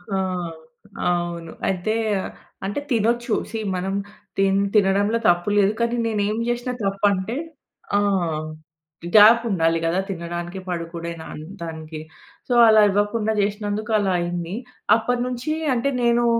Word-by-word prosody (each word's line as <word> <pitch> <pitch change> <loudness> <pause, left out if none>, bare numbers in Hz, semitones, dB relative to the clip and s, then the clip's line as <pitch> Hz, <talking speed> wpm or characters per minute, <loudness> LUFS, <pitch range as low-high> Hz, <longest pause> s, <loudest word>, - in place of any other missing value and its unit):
ఆ! - - +1 0.9
అవును. 175 -1 -2 0.2
అయితే 190 +3 0 0.7
అంటే 200 +7 -2
తినొచ్చు. 235 0 +1 0.2
సీ 225 - -3 0.2
మనం 190 +2 -2 0.4
తిన్ 195 0 +3 0.2
తినడంలో 205 +2 +3
తప్పు 175 +2 +2
లేదు. 205 0 +4
కానీ 235 +1 +1
నేను 215 -2 0
ఏమి 220 +2 -1
చేసినా 240 +1 -2
తప్పు 195 +1 0
అంటే 190 +5 -3 0.6
ఆ! - - +4 1.2
గ్యాప్ 220 +3 +8
ఉండాలి 165 -4 +2
గదా! 170 +3 +1
తినడానికి. 175 0 -5
పడుకునే 170 -1 -4
దాన్ 155 -1 -8 0.2
దానికి. 160 -1 -6 0.5
సో, 250 - 0
అలా 220 -1 +7
ఇవ్వకుండా 205 +2 +1
చేసినందుకు 210 +1 -2
అలా 195 -2 +1
అయింది. 175 +1 -3 0.4
అప్పటినుంచి 245 +4 -1 0.2
అంటే 250 +4 0
నేను 240 0 +3
200 Hz, 125 wpm, -22 LUFS, 175-225 Hz, 1.2 s, గ్యాప్